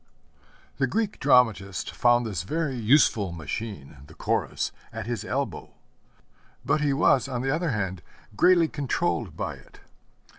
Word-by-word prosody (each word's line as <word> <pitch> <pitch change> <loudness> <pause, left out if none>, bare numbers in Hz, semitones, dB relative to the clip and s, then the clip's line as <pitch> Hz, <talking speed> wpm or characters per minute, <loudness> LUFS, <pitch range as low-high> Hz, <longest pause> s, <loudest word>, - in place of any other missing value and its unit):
The - - +2
Greek 220 -2 -2
dramatist 110 -8 +2
found 120 0 +3
this 100 -8 -3
very 150 - -2
useful 115 - +3
machine, 80 -1 -6
the 80 - -15
Chorus, - - -1 0.2
at 115 -2 -6
his 115 -3 -3
elbow; 135 +5 -4 0.9
but 155 - +1
he 145 -1 +2
was, 135 -2 +3
on 125 -2 -3
the 135 +1 +1
other 165 +1 -1
hand, 95 -7 -2 0.3
greatly 175 - +5
controlled 135 - -2
by - - -3
it. - - -19
120 Hz, 140 wpm, -26 LUFS, 100-145 Hz, 0.9 s, greatly